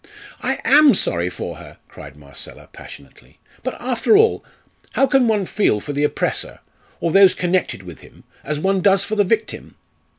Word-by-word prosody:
"I - - -1
am 295 -2 +6
sorry 85 +1 -1
for - - -7
her!" - - -13
cried 70 -1 -13
Marcella, 70 -3 -11
passionately. 70 - -15 0.2
"But, - - -5
after 250 - +2
all, 445 +2 +2 0.5
how 270 - +3
can 270 -3 +2
one 210 -3 0
feel 180 - 0
for 145 - -7
the 145 +1 -1
oppressor, - - -3 0.4
or 170 - -1
those 195 +1 +6
connected 180 - -1
with 90 -3 -11
him, - - -18 0.2
as 150 +1 -3
one 190 +3 0
does 195 0 +3
for 215 - -3
the 205 - +3
victim?" 215 +3 -3
190 Hz, 170 wpm, -19 LUFS, 140-225 Hz, 0.5 s, am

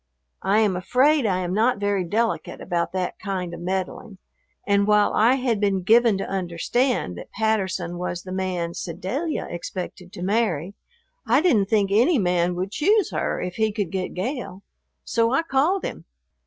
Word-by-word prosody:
I 200 +3 +3
am 205 -4 +2
afraid 255 +8 +3
I 185 -2 0
am 180 0 -2
not 225 +4 +2
very 200 -2 0
delicate 220 +6 -1
about 175 -2 -2
that 185 -1 -3
kind 185 -4 -4
of 170 - -7
meddling, 190 +3 -4 0.5
and 200 0 +2
while 210 -1 +4
I 235 +4 +4
had 250 -5 0
been 195 -2 +1
given 225 +1 +5
to 195 - -3
understand 185 - -1
that - - -11
Patterson 190 -5 -1
was 175 -1 -4
the 185 - -8
man 185 -3 -2
Sedalia 190 - -3
expected 180 +1 -6
to 175 - -6
marry, 195 -4 0 0.5
I 250 +4 +5
didn't 245 - +3
think 205 -3 +2
any 250 - +4
man 180 -3 +1
would 185 +2 -3
choose 405 - +2
her - - -1
if 180 0 -5
he 220 -1 +2
could 205 -5 -3
get 185 -1 -3
Gale, 200 -1 -4 0.4
so 230 0 +1
I 275 - +2
called 325 +6 +1
him. - - -6
200 Hz, 170 wpm, -23 LUFS, 180-230 Hz, 0.5 s, given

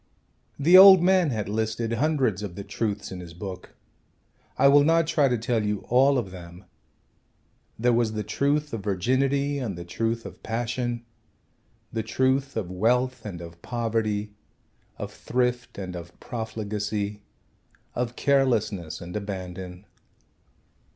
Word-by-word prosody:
The 170 +6 +7
old 190 -2 +10
man 185 -3 +4
had 110 -6 -2
listed 110 +2 -2
hundreds 130 - +1
of 100 -4 -6
the 100 - -6
truths 105 -1 -3
in 95 - -6
his 85 -2 -10
book. 90 0 -8 0.8
I - - +5
will 145 +1 +7
not 165 +2 +4
try 155 -3 +2
to 125 -2 +1
tell 115 0 0
you 105 0 0
of - - -18
all 135 +3 +5
of 95 -7 -2
them. 90 0 -11 1.1
There 120 +2 +2
was 115 -2 +1
the 105 0 -2
truth 145 +3 0
of 115 - -3
virginity 135 +8 +1
and 110 -9 -4
the 85 - -7
truth 115 +6 -2
of - - -10
passion, 120 +1 -3 0.9
the 115 - -1
truth 130 +3 0
of 95 -5 -3
wealth 125 +5 +1
and 85 -4 -7
of 85 0 -11
poverty, 110 -3 -2 0.6
of - - -6
thrift 125 0 -2
and 90 -2 -5
of 85 0 -10
profligacy, 105 -2 -4 0.7
of 125 0 -2
carelessness 115 - +1
and 90 +2 -8
abandon. 95 -2 -6
115 Hz, 145 wpm, -26 LUFS, 100-130 Hz, 1.1 s, old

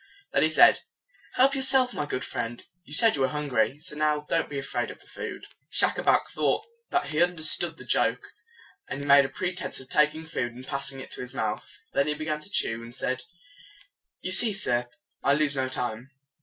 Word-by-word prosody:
Then - - +4
he - - +4
said, - - +6 0.6
"Help 270 +2 +4
yourself, 265 -2 +3
my 145 - -3
good 130 -2 -3
friend. 120 +1 -5 0.2
You 150 - -18
said 225 +6 +6
you 140 - -2
were 135 - +4
hungry: 145 -3 0
so, 150 0 -6
now, 150 -1 0
don't 165 - 0
be 145 - -5
afraid 135 - -3
of - - -10
the - - -21
food." - - -7 0.2
Schacabac - - +3
thought 435 - 0 0.2
that 355 0 0
he 155 +2 +1
un 175 0 +3
der 160 - -4
stood 155 - +1
the - - -9
joke, - - 0 0.6
and 140 - -5
he - - -5
made 140 -1 +6
pretense 180 0 -3
of 130 0 -12
taking 150 +1 +2
food, 120 -6 -3
and 130 +1 -10
passing 140 0 -3
it - - -10
to - - -6
his 125 +1 -8
mouth. 110 -5 -3 0.2
Then 140 - +2
he 150 - 0
began 155 0 -3
to 190 - -11
chew, 115 - 0
and 120 +1 -11
said, 130 -1 -2 1.0
"You 185 - -3
see, 215 +3 +6
sir, 120 -11 +1 0.3
I 140 - +3
lose 145 -1 +1
no 130 -1 -1
time." 125 0 -4
145 Hz, 210 wpm, -27 LUFS, 130-165 Hz, 1.0 s, said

